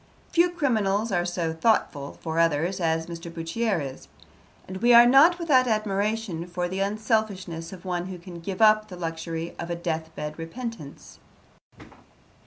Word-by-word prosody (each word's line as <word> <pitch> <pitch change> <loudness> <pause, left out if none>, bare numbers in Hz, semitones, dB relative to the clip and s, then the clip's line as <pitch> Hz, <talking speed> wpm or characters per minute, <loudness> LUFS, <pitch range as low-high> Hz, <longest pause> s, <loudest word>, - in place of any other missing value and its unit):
Few 345 +1 +4
criminals 225 - 0
are 175 -2 +1
so 175 -2 -2
thoughtful 160 -6 0
for 160 0 -2
others 165 +3 +1
as 160 -1 0
Mr. 170 0 -8
Bourchier 175 +5 -1
is, 135 -3 -7 0.6
and 185 - -6
we 240 +4 +5
are 235 0 +10
not 280 +8 +6
without 280 -7 +3
admiration 210 -4 -1
for 175 0 -2
the 190 +2 -4
unselfishness 200 -5 -1
of 190 -1 -11
one 180 -1 -2
who 185 -1 -6
can 175 0 -10
give 185 +5 -2
up 215 0 +5
the 185 -3 -9
luxury 165 0 -5
of 170 - -5
a 170 - -1
death 160 -2 -3
bed 150 +1 -6
repentance. 185 - -8
185 Hz, 160 wpm, -25 LUFS, 165-220 Hz, 0.6 s, are